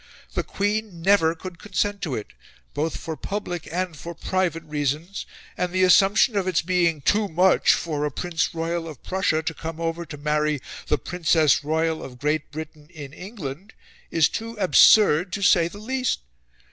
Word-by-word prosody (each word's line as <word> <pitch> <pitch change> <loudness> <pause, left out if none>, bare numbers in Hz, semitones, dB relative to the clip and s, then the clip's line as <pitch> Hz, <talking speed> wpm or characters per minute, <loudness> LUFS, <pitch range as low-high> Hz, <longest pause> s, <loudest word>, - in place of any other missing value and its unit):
The - - 0
Queen 205 -3 -2
NEVER 170 -4 +4
could 175 0 -9
consent 205 0 -2
to 150 -9 -2
it, 105 - -7 0.4
both 155 +3 -2
for 160 - -5
public 175 0 -5
and 180 -1 -2
for 170 +3 -8
private 175 -2 -1
reasons, 150 +4 -3 0.3
and 180 -1 -2
the 185 +1 +2
assumption 195 +5 +5
of 195 -2 0
its 180 -4 +1
being 170 -3 +1
TOO 205 +8 +2
MUCH 180 +2 +4
for 150 -3 -3
a 150 - +1
Prince 165 +3 -2
Royal 165 0 -2
of 150 -6 -10
Prussia 185 -4 0
to 160 - -2
come 165 +1 -7
over 165 +1 -2
to 150 - -8
marry 150 0 0 0.3
the 150 - +2
Princess 160 -4 +2
Royal 160 +1 0
of 125 -2 -9
Great 150 +3 -1
Britain 150 0 -9
in 145 -5 -10
England 185 - -8 0.4
is 160 -2 +4
too 230 0 -6
ABSURD 190 -2 +5
to 200 - -2
say 175 -4 +5
the 185 - -10
least. 255 +4 -1
170 Hz, 170 wpm, -24 LUFS, 155-190 Hz, 0.4 s, assumption